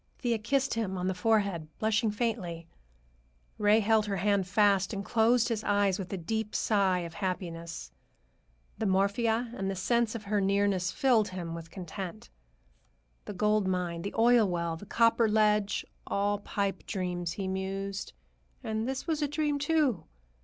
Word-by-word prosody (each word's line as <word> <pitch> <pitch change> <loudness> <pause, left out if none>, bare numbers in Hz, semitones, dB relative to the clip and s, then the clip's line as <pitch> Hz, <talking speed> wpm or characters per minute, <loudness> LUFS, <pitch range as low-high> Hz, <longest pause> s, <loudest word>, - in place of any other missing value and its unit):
Thea 235 -3 0
kissed 270 +5 0
him 210 -4 -2
on 180 - -2
the 190 - +1
forehead, 200 -5 +1
blushing 220 +1 +1
faintly. 205 -7 -3 0.9
Ray 210 +1 +4
held 215 0 +3
her 200 - -1
hand 195 0 +1
fast 200 0 +3
and 200 0 -4
closed 235 +1 +3
his 220 -2 -2
eyes 205 -2 +2
with 190 -1 -6
a 195 - -2
deep 220 +5 -3
sigh 195 -4 +2
of 170 -1 -6
happiness. 170 -4 -4 0.9
The 220 - 0
morphia 220 +5 +1
and 195 -3 -2
the 195 - -2
sense 235 +4 +1
of 225 - -5
her 205 0 0
nearness 195 -2 +1
filled 235 -6 +3
him 180 -3 -5
with 165 0 -8
content. 185 +3 -7 0.9
The - - -6
gold 210 +1 +2
mine, 180 -2 -1
the 200 - -5
oil 230 -2 +5
well, 170 -2 -1
the 190 +5 -11
copper 230 +1 +3
ledge—all 210 -1 0
pipe 200 -2 -3
dreams, 180 -3 -2
he 190 +1 -4
mused, 195 +1 -4 0.5
and 220 0 -2
this 265 0 -3
was 320 -2 -1
a 295 - +2
dream, 295 0 -1
too. 290 - +1
205 Hz, 160 wpm, -29 LUFS, 185-225 Hz, 0.9 s, oil